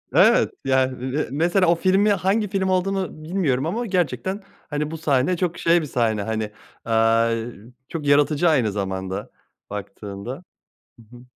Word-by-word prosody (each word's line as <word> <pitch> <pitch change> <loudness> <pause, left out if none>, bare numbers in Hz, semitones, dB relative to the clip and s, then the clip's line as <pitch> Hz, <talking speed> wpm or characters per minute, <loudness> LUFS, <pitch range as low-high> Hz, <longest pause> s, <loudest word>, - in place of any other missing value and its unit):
Evet. - - +5
Yani 130 -1 +2 0.2
me 145 +4 -1
mesela 175 +5 +2
o 170 - +5
filmi 195 +4 +3
hangi 205 +3 +1
film 190 -1 -1
olduğunu 185 -3 -1
bilmiyorum 155 -6 0
ama 230 +8 -2
gerçekten, 185 - -1 0.3
hani, 150 +1 -2
bu 165 - -5
sahne 145 +3 +1
çok 175 -2 -1
şey 170 0 +3
bir - - -4
sahne, 110 -5 0
hani, 110 -1 -3 0.3
aaa, 115 0 +3 0.6
çok 155 -3 -5
yaratıcı 145 +3 +3
aynı 125 -9 +2
zamanda 95 0 -4 0.4
baktığında. 105 - -7 0.6
Hı 115 +2 -17
hı. - - -14
150 Hz, 150 wpm, -23 LUFS, 115-180 Hz, 0.6 s, Evet